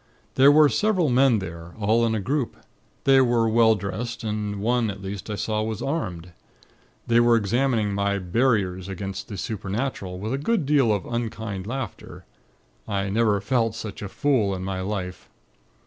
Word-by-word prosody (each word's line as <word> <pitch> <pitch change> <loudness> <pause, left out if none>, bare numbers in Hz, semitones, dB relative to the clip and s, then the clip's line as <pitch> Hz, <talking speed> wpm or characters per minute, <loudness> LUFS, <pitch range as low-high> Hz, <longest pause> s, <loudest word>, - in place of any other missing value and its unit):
There 135 +2 +6
were 150 0 +7
several 185 -2 +1
men 125 -1 +4
there, 85 -3 -7
all 110 +3 +2
in 110 - 0
a - - -1
group. 130 +5 -2 0.5
They 135 -1 +6
were 120 -2 +2
well 110 0 +4
dressed, 110 +4 -5
and 105 -2 -3
one, 115 +1 +1
at 100 -1 -6
least, 100 +2 -6
I 105 - -2
saw 110 +1 -1
was 110 -1 -3
armed. 90 - -3 0.7
They 120 0 +3
were 120 0 +5
examining 115 0 +1
my 100 0 0
'Barriers' 95 -2 0
against 95 0 -5
the 100 - -7
Supernatural, 100 -1 -3
with 110 +6 -4
a 135 - -1
good 195 +1 0
deal 135 -5 +3
of 100 -3 -1
unkind 110 -4 -4
laughter. 130 -3 -6 0.6
I 100 -1 -1
never 105 -1 +2
felt 115 +1 0
such 110 -3 -7
a 100 - -5
fool 115 -7 +1
in 90 - -5
my 95 0 -3
life. 95 -2 -5
110 Hz, 170 wpm, -24 LUFS, 100-120 Hz, 0.7 s, were